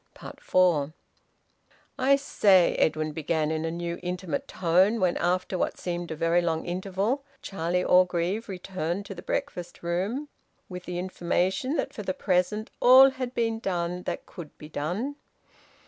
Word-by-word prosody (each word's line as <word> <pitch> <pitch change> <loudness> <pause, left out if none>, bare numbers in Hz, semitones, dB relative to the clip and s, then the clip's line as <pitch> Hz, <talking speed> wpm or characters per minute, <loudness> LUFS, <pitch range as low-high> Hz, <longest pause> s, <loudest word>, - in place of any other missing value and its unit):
FOUR. 160 -5 +2 1.1
"I 270 +2 +5
say," 200 -10 +4
Edwin 155 0 +1
began, 155 0 -1
in 160 0 -2
a - - -1
new 170 +1 -4
intimate 180 -2 -3
tone, 185 +6 +2
when 180 -3 +2
after 180 +1 0
what - - -1
seemed 175 -1 -4
a 160 - -4
very 165 +2 +2
long 165 -2 -1
interval 195 +9 -1 0.2
Charlie 180 -1 -1
Orgreave 180 +4 +2
returned 185 0 -4
to 195 - -7
the 175 - -9
breakfast 175 -1 -4
room 195 +12 -2 0.4
with 180 -1 -8
the 180 - -4
information 185 - -1
that - - -2
for - - -6
the 185 -2 -3
present 185 +4 0
all 260 +2 +8
had 255 -1 -5
been 225 -1 0
done 180 -3 -2
that - - -3
could 165 -4 -11
be 150 - -11
done. 185 - -3
180 Hz, 150 wpm, -27 LUFS, 170-200 Hz, 1.1 s, all